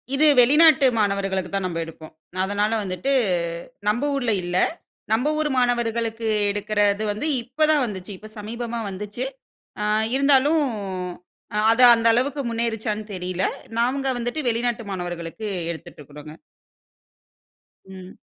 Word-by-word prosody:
இது 300 +3 +3
வெளிநாட்டு 295 +3 +6
மாணவர்களுக்குத்தான் 195 -2 -1
நம்ப 170 -2 -4
எடுப்போம். 160 -1 -12 0.3
அதனால 205 +2 0
வந்துட்டு 185 +7 -2 0.8
நம்ப 225 +6 +1
ஊர்ல 245 -4 0
இல்ல. 175 +1 -2 0.6
நம்ப 245 +6 +2
ஊர் 310 -1 +1
மாணவர்களுக்கு 230 -2 0 0.2
எடுக்கறது 205 0 0
வந்து 215 +9 -4 0.2
இப்பதான் 300 +4 +2
வந்துச்சு. 195 -2 -7
இப்ப 215 +2 -12
சமீபமா 235 +2 -5
வந்துச்சு. 205 +5 -5 0.6
அ - - -1 0.3
இருந்தாலும் 280 +3 +4 1.0
அ - - +2
அது 240 +3 +2
அந்த 230 0 -1
அளவுக்கு 275 +4 0
முன்னேறிச்சான்னு 220 -2 -2
தெரியல. 180 0 -2 0.4
நாங்க 265 +3 0
வந்துட்டு 245 +6 -3
வெளிநாட்டு 235 0 -1
மாணவர்களுக்கு 175 +3 -5 0.2
எடுத்துட்டு 160 - -11
இருக்குறோங்க. 150 +1 -11 1.5
ம். 190 -1 -11
220 Hz, 115 wpm, -23 LUFS, 190-245 Hz, 1.5 s, வெளிநாட்டு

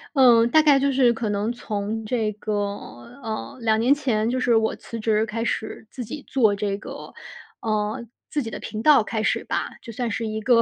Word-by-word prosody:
嗯， 240 -4 +6
大 310 +4 +5
概 290 -3 +6
就 275 0 +2
是 255 -3 +4
可 225 -2 -3
能 205 +2 0
从 220 -2 -3
这 220 -2 0
个 215 +1 -5 0.7
呃， 225 +5 -5
2 220 -1 +2
年 245 +5 +5
前， 240 -7 0
就 255 +1 0
是 240 -2 +3
我 220 0 +2
辞 230 - -8
职 215 0 +2
开 230 +2 -3
始 220 -1 -3
自 250 - -5
己 285 +6 -7
做 220 -6 +3
这 200 -1 -2
个， 205 - -9 0.5
呃， 215 0 -1 0.3
自 295 - -1
己 230 - -5
的 - - -6
频 215 - -5
道 295 -3 +6
开 220 0 -2
始 - - 0
吧， - - -2
就 230 - -8
算 240 +1 -2
是 225 +2 -2
一 220 0 -3
个 230 +1 +5
225 Hz, 220 characters per minute, -24 LUFS, 215-250 Hz, 0.7 s, 嗯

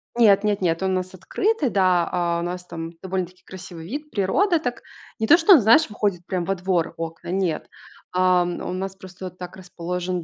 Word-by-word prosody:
Нет 215 -5 +5
нет 210 -1 0
нет, 165 -2 +1
он 190 0 +1
у - - +1
нас 185 0 -3
открытый. 380 - 0
Да, 185 -4 +3
а, 170 -1 0
у - - -3
нас 180 +1 -4
там 165 -1 -6
довольно-таки 185 -1 -4
красивый 180 -3 -10
вид. 295 - -6
Природа 330 - +2
так 245 -6 -4 0.4
не 220 - 0
то 335 - +8
что 355 +4 +7
он, 310 - +7
знаешь, 235 +9 +5
выходит 200 -4 -2
прям 180 -2 -2
во 195 - 0
двор 180 -2 -1
окна, 165 0 -6
нет, 180 -4 -1 0.5
а, 180 0 +4
м, 175 0 -4
у - - -3
нас 190 +1 -4
просто 185 -1 -9
так 180 0 -10
расположен 180 -1 -4
185 Hz, 205 wpm, -23 LUFS, 175-205 Hz, 0.5 s, то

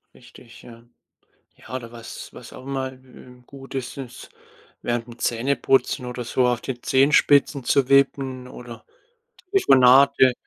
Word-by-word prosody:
Richtig, 120 -1 -17
ja. 115 -1 -14 0.7
Ja, - - -10
oder 120 -3 -7
was 115 -1 -10
was - - -12
auch - - -11
immer, 135 -1 -3
äh, 130 -1 -17
gut 135 0 -12
ist, 130 0 -5
ist, 125 -3 -9 0.5
während 120 -1 -3
dem 120 0 -12
Zähneputzen 130 +1 0
oder 125 0 -6
so 125 +2 0
auf 120 -1 -1
den 125 -2 -6
Zehenspitzen 140 0 +3
zu 135 +1 +1
wippen 135 -2 +1
oder 120 -2 -11 0.7
Telefonate 135 - +5
130 Hz, 140 wpm, -22 LUFS, 120-135 Hz, 0.7 s, Telefonate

